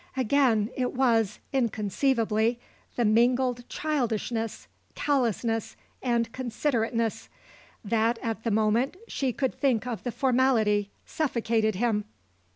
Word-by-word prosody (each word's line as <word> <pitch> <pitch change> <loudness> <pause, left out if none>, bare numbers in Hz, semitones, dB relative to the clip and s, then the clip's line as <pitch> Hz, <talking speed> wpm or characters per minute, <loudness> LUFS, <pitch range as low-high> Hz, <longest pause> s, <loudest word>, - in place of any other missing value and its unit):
Again 250 -4 +2
it 250 -1 -1
was, 230 -5 +2 0.2
inconceivably, 230 -1 +1 0.4
the 240 - +1
mingled 245 +2 +2
childishness, 235 -6 -2 0.3
callousness 235 -5 0 0.3
and 235 -2 0
considerateness. 230 -3 -1 0.6
That, 230 +2 +1
at 225 -1 -3
the 230 - 0
moment, 220 - +1
she 265 -2 -1
could 265 +1 -1
think 250 -5 +1
of 235 -6 -4
the 245 - -3
formality, 235 -6 +2 0.2
suffocated 230 -7 0
him. 210 0 0
235 Hz, 105 wpm, -27 LUFS, 220-255 Hz, 0.6 s, Again